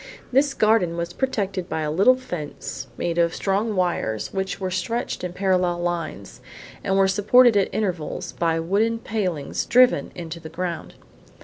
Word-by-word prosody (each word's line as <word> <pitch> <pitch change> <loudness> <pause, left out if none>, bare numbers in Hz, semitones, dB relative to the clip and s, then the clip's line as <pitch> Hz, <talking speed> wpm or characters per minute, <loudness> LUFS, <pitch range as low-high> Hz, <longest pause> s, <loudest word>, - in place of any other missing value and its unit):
This 275 +2 +3
garden 215 -6 +2
was 170 0 -3
protected 200 -8 -2
by 160 - -2
a 150 -1 -1
little 200 +11 +5
fence 150 - -6
made 170 0 -1
of 170 0 +2
strong 205 +2 0
wires 175 - -1
which 190 0 -2
were 185 -1 -3
stretched 230 +6 -2
in 180 - -3
parallel 180 -1 +1
lines, 165 - -4 0.4
and 195 - +1
were 195 0 +5
supported 215 +5 +5
at 200 -2 +2
intervals 180 -3 -3
by 165 -1 0
wooden 205 +7 +1
palings 190 -10 -2
driven 245 - +4
into 170 -1 -6
the 160 -1 -9
ground. 170 0 -5
185 Hz, 155 wpm, -23 LUFS, 170-210 Hz, 0.4 s, little